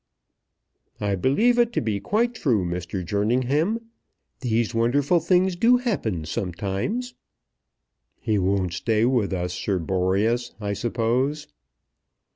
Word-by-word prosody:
"I 100 -1 -1
believe 175 - +2
it 240 -1 +3
to - - +1
be 110 -3 -1
quite 235 - 0
true, 120 - +1
Mr. 90 +1 -4
Jerningham. 130 - 0 0.5
These 115 -2 0
wonderful 135 +9 +2
things 185 +1 +2
do 235 +7 +4
happen 115 - -2
sometimes." 100 - -3 1.1
"He 110 -3 0
won't 95 -2 0
stay 110 +2 +1
with 120 -6 +1
us, 90 -1 -2
Sir 95 +1 -1
Boreas, 95 +7 0
I 100 -1 -2
suppose?" 120 +7 -1
115 Hz, 115 wpm, -24 LUFS, 95-160 Hz, 1.1 s, do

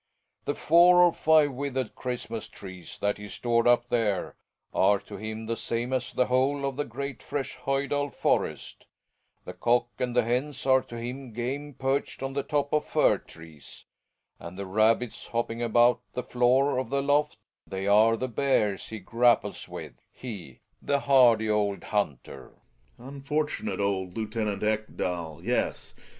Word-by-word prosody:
The 145 - -1
four 175 +2 +6
or 175 -1 +5
five 155 -2 +4
withered 130 -2 -3
Christmas 120 -3 -5
trees 95 -4 -10
that 100 0 0
he 105 - -8
stored 115 +2 0
up 120 0 +3
there 105 -6 0 0.4
are 100 +2 +4
to 100 - -10
him 110 +2 -6
the 115 +1 -2
same 115 +3 -3
as 130 -1 -1
the 125 - +1
whole 135 +3 +1
of 135 -1 -2
the 145 +1 -2
great, 140 +4 -6
fresh 140 -2 -4
Hojdal 140 +1 -1
forest; - - -2 0.6
the - - -7
cock 120 0 +1
and 125 -1 -2
the 125 - +4
hens 130 +5 -2
are 130 -1 +5
to 120 - -10
him 125 +1 -6
game 135 +5 -4
perched 135 0 -2
on 135 0 -3
the 140 - 0
top 145 +1 -1
of 150 - +3
fir - - +2
trees, 80 -3 -14 0.5
and 85 +2 -9
the 100 - -4
rabbits 110 +4 +1
hopping 115 0 -2
about 120 +1 +4
the 125 - -3
floor 125 +3 +2
of 130 -3 -4
the 140 +1 0
loft, 145 +1 +1 0.3
they 95 0 -4
are 110 +3 +5
the 130 - -2
bears 115 -6 0
he 110 - -6
grapples 120 +4 +1
with, - - -8 0.2
he, 100 - -9 0.2
the 140 -1 0
hardy 120 -6 +5
old 105 -2 0
hunter. 70 - -3 0.4
Gregers. 130 +4 -10
Unfortunate 150 - -2
old 95 -2 -1
Lieutenant 110 -2 -2
Ekdal, 90 -7 -2
yes. - - -1
120 Hz, 160 wpm, -27 LUFS, 105-135 Hz, 0.6 s, four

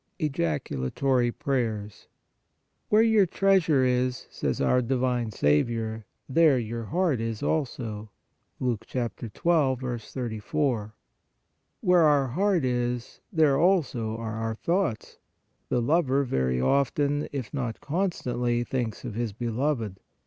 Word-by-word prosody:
EJACULATORY 120 - 0
PRAYERS. 115 -7 -3 0.4
" - - -49
Where 215 +1 +5
your 220 -4 +4
treasure 170 -7 +3
is," 125 0 0
says - - -2
our 125 - +3
divine 125 -1 0
Saviour, 110 +6 0
" - - -50
there 160 -5 +6
your 115 -1 -4
heart 165 - 0
is 115 -2 -3
also" 115 -8 -2 0.5
(Luke 120 -4 -2
12. 120 -3 -2 0.9
34). 115 -1 -2 0.9
Where 180 -1 +4
our 145 -4 +4
heart 185 +2 +1
is, 120 -1 -2
there 155 -6 +3
also 135 - +1
are 110 -1 -4
our 115 0 -2
thoughts. 170 - -1 0.5
The 120 - +1
lover 140 -1 +2
very 65 - 0
often, 140 - +1
if 135 -5 -5
not 125 -6 -3
constantly, 125 -8 -1
thinks 120 -2 -3
of 120 - -4
his 115 -1 -2
beloved. 115 -2 -2
125 Hz, 120 wpm, -27 LUFS, 115-145 Hz, 0.9 s, there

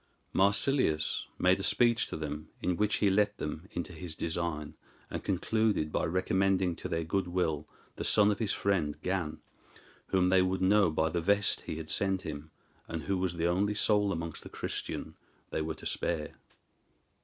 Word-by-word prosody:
Marsilius 100 - +2
made 90 +1 +3
a - - -3
speech 120 +1 +3
to - - -5
them, 75 -1 -5
in 90 - 0
which 105 +3 +1
he 100 -2 +3
let 105 +1 +2
them 80 +4 -5
into 85 +1 -5
his 80 0 -6
design, 80 -2 -3 0.4
and - - -4
concluded 100 -3 +1
by - - 0
recommending 95 0 +1
to - - -6
their 80 0 -1
good 90 +3 -1
will 80 -4 -1 0.3
the - - -3
son 105 -1 +5
of 100 - -2
his 110 -4 0
friend 85 -7 0
Gan, 90 -5 -2 0.7
whom 90 -1 +2
they 95 0 +5
would 95 +1 +1
know 100 -1 +5
by 80 +1 +1
the 85 +1 -1
vest 100 +3 +2
he - - -3
had 80 0 -5
sent 95 -1 +1
him, 75 0 -6 0.4
and 80 -1 -4
who 100 -2 0
was 90 -2 -1
the 85 0 -1
only 100 +4 +1
soul 105 -1 +3
amongst 85 -2 -4
the - - -10
Christian - - -5 0.3
they - - -1
were 80 0 -3
to - - -12
spare. 80 -3 -2
90 Hz, 180 wpm, -31 LUFS, 80-100 Hz, 0.7 s, son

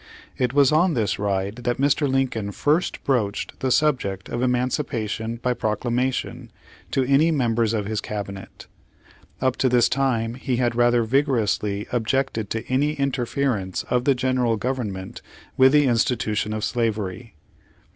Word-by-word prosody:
It 125 -2 0
was 140 0 +4
on 160 +2 +3
this 110 -4 0
ride 100 +1 -1
that 120 0 -2
Mr. 140 +1 +2
Lincoln 130 -6 -1
first 155 +5 0
broached 110 -7 -1
the 130 - -1
subject 125 -9 0
of 120 - -3
emancipation 125 -3 -1
by 125 +1 -1
proclamation 120 +3 -2 0.4
to 135 - +1
any 140 +5 +3
members 120 -7 +1
of 105 -2 -2
his 110 +1 -2
cabinet. 100 -2 -7 0.8
Up 130 -1 +1
to 130 - +2
this 120 -1 +4
time 120 -4 0
he 130 0 -2
had 120 -1 +1
rather 120 0 +3
vigorously 110 -5 0
objected 120 -2 -1
to 115 - -3
any 140 +4 +1
interference 130 -7 -1
of 125 0 +1
the 140 - +4
General 125 -2 +1
Government 105 -5 -4 0.3
with 130 0 +6
the 150 0 +5
institution 115 -3 0
of 110 0 -3
slavery. 110 -4 -2
120 Hz, 145 wpm, -23 LUFS, 110-135 Hz, 0.8 s, with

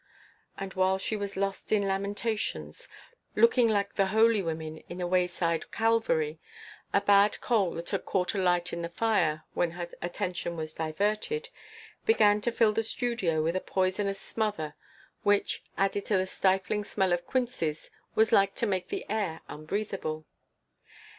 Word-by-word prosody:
And, 195 -1 -5
while 190 0 +2
she 205 +3 -2
was 200 -2 -4
lost 195 0 -2
in 205 -2 +3
lamentations, 205 - -2 0.5
looking 255 - +5
like 200 -2 +1
the 195 -1 +2
holy 220 +1 +4
women 160 -2 -4
in 175 - -6
a 180 - -1
wayside 180 -2 0
calvary, 220 -9 +1 0.5
a 200 - +3
bad 205 +1 +4
coal 205 -7 +1
that 170 +1 -6
had - - -1
caught 180 -2 0
alight 180 -3 +1
in 170 - -3
the 170 - -3
fire 170 -6 +1
when 175 - +1
her 175 -1 -3
attention 175 0 -3
was 155 -1 -5
diverted, 210 - -1 0.5
began 210 - +4
to 240 - 0
fill 225 -2 +3
the 225 - +1
studio 225 -9 0
with 165 +3 0
a 185 - 0
poisonous 195 +1 0
smother 210 -10 -2 0.5
which, 205 0 +1
added 195 +1 0
to 205 - +3
the 185 - +1
stifling 190 +2 +1
smell 190 -3 +1
of 175 0 -2
quinces, 240 -12 -2 0.2
was 220 0 +4
like 195 -3 +4
to - - 0
make 190 -4 -1
the - - -4
air 200 -7 -2
unbreathable. 155 -1 -4
195 Hz, 155 wpm, -29 LUFS, 175-215 Hz, 0.5 s, looking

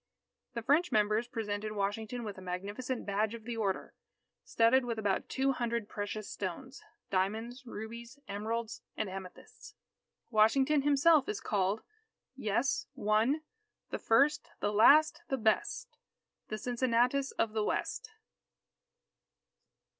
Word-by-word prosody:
The 235 - -3
French 310 +8 +3
members 215 +2 +2
presented 215 -3 -3
Washington 215 +4 -2
with 210 -3 -5
a - - -11
magnificent 205 +8 -4
badge 210 +2 0
of 230 - -10
the 235 +1 -4
Order, 205 -4 -2 0.5
studded 230 +3 +4
with 235 -2 -3
about 205 -3 -1
two 270 +1 +1
hundred 235 -4 -2
precious 205 0 -5
stones 205 +8 -6 0.3
diamonds, 225 +7 -1
rubies, 235 +4 -8
emeralds, 220 +3 -3 0.2
and 215 - -1
amethysts. 190 -1 -10 0.6
Washington 265 +7 +4
himself 290 +1 +4
is 210 - -2
called: 200 +1 0 0.5
"_Yes 235 +1 0
one 230 +6 +2 0.5
the - - -3
first 275 +6 +3
the 205 - 0
last 310 +10 +6
the 270 - -1
best, 220 -2 0 0.5
The 215 - -4
Cincinnatus 250 +3 +1
of 220 -1 0
the 215 -1 0
West. - - -2
225 Hz, 125 wpm, -32 LUFS, 210-255 Hz, 0.6 s, last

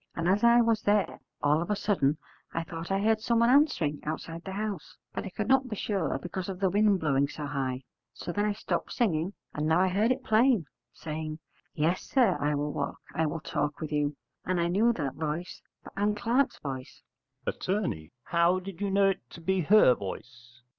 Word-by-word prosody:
And 165 0 -1
as 195 +5 +2
I 235 0 +7
was 230 -2 +2
there 205 -1 +1 0.2
all 150 +2 +3
of 170 - -4
a 210 - +2
sudden 170 -8 +1 0.4
I 165 - 0
thought 165 0 -7
I 195 0 +1
heard 215 +1 +2
someone 235 +1 +3
answering 255 - +3
outside 165 +2 -5
the 190 - -6
house, 205 -4 -4 0.2
but - - -4
I - - -5
could 205 +3 -4
not 265 0 +4
be 215 - -3
sure 195 -9 -1
because 175 +5 -5
of 185 -2 -5
the 190 -2 +2
wind 205 0 +3
blowing 140 -3 +2
so 150 +1 -6
high. 135 -2 -2 0.3
So - - -6
then 205 +4 0
I 210 - +1
stopped - - -3
singing, 185 -6 0 0.2
and 150 +1 -1
now 160 +2 +4
I 190 0 +3
heard 210 +6 +2
it 255 0 -1
plain, 225 - +3 0.3
saying, 155 -1 -5 0.4
'Yes, 165 +4 +1
sir, 240 -9 +2
I 150 +1 +1
will 145 0 -2
walk, 140 - -3
I 160 0 +1
will 155 +1 -4
talk 145 -1 -2
with 155 -2 -5
you,' 145 -1 0 0.3
and 185 -1 0
I 170 0 +1
knew 215 +7 +3
the 145 - -2
voice 155 +4 -4 0.2
for - - -11
Ann 205 +1 +1
Clark's 240 +6 +1
voice. 130 -3 -7 0.4
Att. - - -4 0.6
How 170 +2 +2
did 185 0 -9
you 200 - 0
know 195 0 +4
it 120 -11 -4
to - - -11
be 190 +3 0
her 180 -6 +6
voice? 120 +4 -9
180 Hz, 210 wpm, -29 LUFS, 150-210 Hz, 0.6 s, I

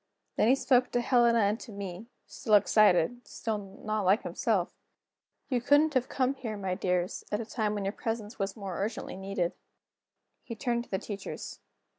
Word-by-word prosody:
Then - - +3
he 255 - +6
spoke 250 -2 +3
to 245 - +2
Helena 235 -2 +4
and 205 +2 +1
to - - -10
me, 200 +1 -7 0.2
still 215 -3 +1
excited, 210 +1 +4
still 220 -3 -3
not 210 +2 -4
like 195 +4 +3
himself: - - 0 0.7
"You 250 -4 0
couldn't 290 +4 +4
have 255 -1 +1
come 260 0 +1
here, 230 -6 -5
my 190 -2 -2
dears, 180 -1 -1
at 210 - 0
a 230 - -4
time 215 -2 -1
when 200 -1 -3
your 195 - 0
presence 225 +1 -4
was 195 +2 -2
more 195 -4 -5
urgently 205 0 -3
needed." 190 -2 -2 0.9
He 230 - -6
turned 235 0 -1
to - - -26
the 190 - 0
teachers. 200 0 -7
215 Hz, 180 wpm, -30 LUFS, 195-240 Hz, 0.9 s, he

